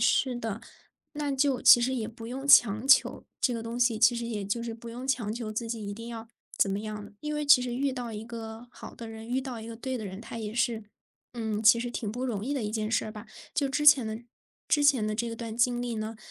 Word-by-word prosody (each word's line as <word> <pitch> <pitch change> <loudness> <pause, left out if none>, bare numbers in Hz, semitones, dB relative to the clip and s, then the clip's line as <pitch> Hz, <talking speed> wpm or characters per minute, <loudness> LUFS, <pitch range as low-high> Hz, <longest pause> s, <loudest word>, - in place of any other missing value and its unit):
是 245 +2 +2
的， 225 -2 -4 0.5
那 295 -1 -3
就 270 -2 +1
其 - - +9
实 255 +2 0
也 225 -4 -3
不 225 0 -10
用 265 +4 -6
强 230 -1 +6
求， 275 - +4
这 260 -1 +1
个 230 -1 -4
东 230 +1 -5
西， 240 -2 +2
其 235 +2 +5
实 235 - -3
也 220 -3 -3
就 205 +4 -2
是 235 - -4
不 230 +1 -10
用 245 +3 -7
强 250 -6 0
求 225 -1 -5
自 230 +2 -3
己 225 -3 -4
一 200 - -4
定 230 +3 -8
要 225 -1 -8 0.3
怎 195 - +3
么 195 +1 -2
样。 210 -1 -7
因 300 0 -3
为 300 0 -2
其 285 -3 +7
实 245 -1 -3
遇 275 +1 0
到 245 -2 -5
一 215 0 -6
个 225 0 -8
好 - - -11
的 230 - -9
人， 220 0 -9
遇 255 +2 0
到 255 -4 -6
一 220 - -9
个 230 0 -8
对 260 +2 -4
的 215 - -5
人， 190 +2 -8
它 230 - -7
也 215 -1 -5
是， 230 -2 0 0.5
嗯， 220 -2 -2
其 235 +2 +7
实 240 +1 -3
挺 225 -3 -4
不 245 +4 -4
容 215 -6 -2
易 275 +6 -2
的 265 - -2
一 210 - -2
件 215 -1 -2
事 225 - +1
儿 215 - -6
吧。 215 0 -10 0.3
就 290 -6 +1
之 295 +2 -1
前 235 -6 +5 0.4
之 295 - +2
前 270 -7 +4
的 215 - -1
这 230 +1 -3
段 225 -1 -6
经 240 +1 +1
历 240 -2 -3
呢， 215 +1 -4
235 Hz, 285 characters per minute, -28 LUFS, 220-250 Hz, 0.5 s, 其